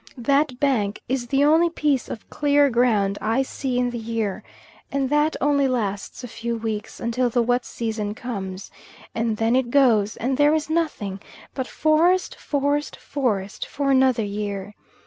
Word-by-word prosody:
That 275 +1 +1
bank 220 -8 +1
is 255 -1 -2
the 275 +3 +3
only 325 +3 +5
piece 295 -5 0
of 220 - -7
clear 285 -1 +3
ground 215 -5 +2
I 225 +5 +1
see 260 -1 -3
in 245 0 +1
the 240 - -4
year, 225 -3 -3 0.5
and 275 -1 -1
that 295 +1 +2
only 280 -1 +2
lasts 215 -2 -3
a - - -5
few 230 +1 -4
weeks 220 -1 -4
until 240 +2 0
the 240 0 +2
wet 245 +1 +1
season 220 -2 -3
comes, 195 -6 -6 0.4
and 225 -1 -1
then 225 +2 +2
it 260 -2 +1
goes, 230 -6 +3
and 255 +3 -1
there 295 +1 +5
is 315 0 -2
nothing 295 - -1 0.3
but 260 -2 -3
forest, 335 +4 +2
forest, 290 +1 -1
forest, 210 -9 -2
for 280 -1 -1
another 260 -4 +3
year. 205 -1 -4
245 Hz, 165 wpm, -23 LUFS, 220-280 Hz, 0.5 s, only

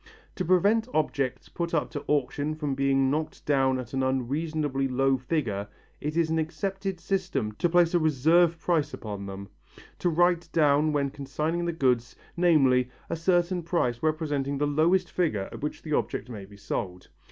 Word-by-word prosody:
To 185 - -1
prevent 200 +6 +3
objects 140 -4 -1
put 170 -1 -3
up 150 - -1
to 145 - -5
auction 145 +1 0
from 150 -3 -2
being 135 0 +2
knocked 155 +2 -3
down 135 -2 +2
at 125 -1 -7
an 135 - 0
unreasonably 135 +2 -1
low 135 +1 +2
figure 125 -7 -2 0.3
it 150 +2 -3
is 165 -1 +2
an 160 - +1
accepted 190 +4 -3
system 185 - -1
to 175 - +2
place 175 0 +4
a 175 - +4
reserve 160 +3 +3
price 160 -3 0
upon 100 -2 -6
them, 100 0 -7 0.5
to 175 - +1
write 175 0 +2
down 150 -1 +3
when 140 -2 0
consigning 150 +5 -2
the 170 - 0
goods, 125 -7 0 0.2
namely, 135 -8 +4 0.2
a - - 0
certain 175 +1 +1
sum 165 -7 +1
representing 150 -3 -1
the 145 - +1
lowest 170 +5 +2
figure 110 - 0
at - - -9
which 150 - -4
the 155 - -3
object 115 -4 -1
may 105 -5 -7
be 100 +1 -15
sold. 90 -2 -5
150 Hz, 175 wpm, -27 LUFS, 130-170 Hz, 0.5 s, place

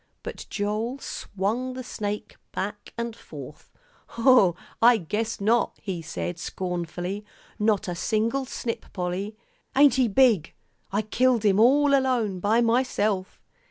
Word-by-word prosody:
But - - -7
Joel 215 +5 -2
swung 235 +1 -3
the 255 - -5
snake 210 -2 -5 0.2
back 205 +2 -4
and 235 -1 -3
forth. - - -11 0.4
"Hoh, 230 -7 +5 0.3
I 235 +1 +7
guess 215 +5 -3
not!" 225 +4 +2
he 185 -5 -4
said 170 +2 -4
scornfully, 180 +2 -4 0.4
"not 210 -1 +2
a 180 - -2
single 220 +8 0
snip, 235 -2 -5
Polly. 190 +3 -3 0.4
Ain't 280 0 +7
he 245 - +4
big! 225 - +3 0.4
I 205 +2 0
killed 240 +1 +2
him 200 -1 +4
all 280 +5 +5
alone 250 -8 +2
by 215 +5 +3
myself." 220 -5 +1
215 Hz, 130 wpm, -26 LUFS, 195-240 Hz, 0.4 s, I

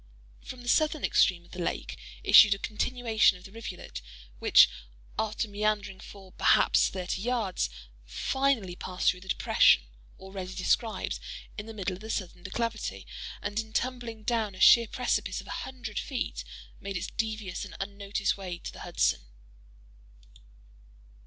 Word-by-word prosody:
From 250 -1 -9
the - - -11
southern 310 +3 +2
extreme 175 -3 +3
of - - -21
the 180 - -6
lake - - -3 0.3
issued 210 -2 +8
a - - -8
continuation 225 -1 +2
of 180 - -17
the 195 - -12
rivulet, 215 -4 -7 0.4
which, - - +7 0.5
after 220 +1 -1
meandering 210 -2 -1
for, 195 -2 -12
perhaps, - - +4
thirty 185 0 -3
yards, 225 - 0 0.3
finally 225 - 0
passed 180 0 +1
through 180 - -11
the 190 - -13
"depression" 60 - +4 0.3
(already 190 -1 -7
described) 220 +4 0 0.4
in 210 -1 -7
the 225 - -7
middle 195 -2 -2
of 185 - -13
the 220 - -8
southern 180 -4 -3
declivity, 190 - -3 0.4
and 220 +2 -3
tumbling 245 -3 -2
down 220 -3 0
a - - -12
sheer 235 +3 +8
precipice 250 +3 -1
of - - -9
a - - -13 0.2
hundred 230 -5 -5
feet, 265 0 -3 0.4
made 195 -1 -4
its 170 - -3
devious 215 -4 -3
and 195 -4 -9
unnoticed 200 +1 -2
way 185 -3 -6
to - - -7
the - - -11
Hudson. - - 0
205 Hz, 150 wpm, -29 LUFS, 185-230 Hz, 0.5 s, issued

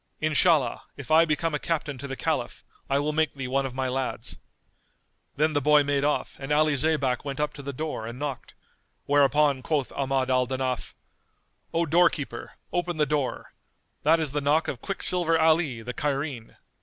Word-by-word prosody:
Inshallah, 155 -4 +2 0.2
if 140 +1 -8
I 160 +1 +7
become 160 +1 0
a 150 - 0
captain 150 -5 -2
to 140 - -6
the 135 - -5
Caliph, - - -2 0.3
I 135 - +2
will 150 +2 0
make 155 -2 +1
thee 135 -2 -4
one 135 +1 0
of 130 - -9
my 130 0 -1
lads." 130 0 -3 1.0
Then 155 +2 +2
the 145 - +1
boy 150 +1 +5
made 140 -1 0
off 150 0 -1
and 135 +1 -6
Ali 155 0 +3
Zaybak 140 -4 +1
went 140 -1 -5
up 150 0 -1
to 140 - -9
the 140 0 -5
door 140 -5 -4
and 120 +1 -7
knocked; 140 -2 -5 0.5
whereupon 145 -1 +3
quoth 145 -1 -1
Ahmad 135 -1 0
al 130 -1 +2
Danaf, 130 -1 -3 0.8
"O 165 +1 +1
doorkeeper, 155 -6 +1 0.2
open 175 -1 -1
the 150 - +3
door; 145 -3 -2 0.5
that 160 +3 +4
is 155 -4 -1
the 145 +1 -1
knock 150 +3 +2
of 125 - -4
Quicksilver 180 -4 +1
Ali 160 -7 +2
the 125 +2 -5
Cairene." 140 -4 -3
145 Hz, 180 wpm, -26 LUFS, 135-155 Hz, 1.0 s, I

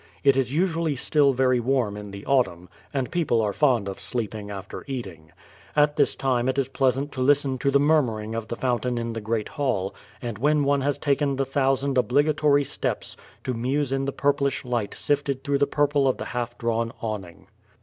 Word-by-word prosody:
It 140 -1 +5
is 130 -2 0
usually 165 -1 +1
still 140 +2 +3
very 130 -1 +2
warm 120 -4 0
in 105 0 -7
the 100 +1 -9
autumn, 90 -10 +1 0.2
and 135 -3 -2
people 160 -9 +1
are 105 -2 0
fond 125 -8 +2
of 95 - -5
sleeping 110 -4 -4
after 100 -1 -7
eating. 95 - -6 0.4
At 150 0 +4
this - - +2
time 130 -2 +1
it 130 - -1
is 135 -1 0
pleasant 135 +1 0
to 130 - -4
listen 135 -1 +2
to 140 - +1
the 140 0 +4
murmur 145 -7 +3
ing 110 +1 -6
of 115 -1 -4
the 120 - -4
fountain 125 -1 -1
in 115 0 -3
the 115 - -4
great 110 0 -1
hall, 120 -10 -1 0.3
and 115 -4 -5
when 150 +3 +3
one 140 0 +2
has 145 +1 0
taken 140 -1 +1
the 135 0 0
thousand 135 0 +1
obligatory 145 +2 +3
steps, - - -3 0.3
to 130 - -2
muse 130 +4 -1
in 135 0 0
the 140 - -1
purplish 140 -1 0
light 120 -4 -2
sifted 140 -2 -1
through 140 -2 0
the 140 - +3
purple 145 -1 +2
of 130 - +1
the - - -5
half 120 -1 -3
drawn 115 -1 -1
awning. 100 -6 -5
130 Hz, 200 wpm, -25 LUFS, 115-140 Hz, 0.4 s, It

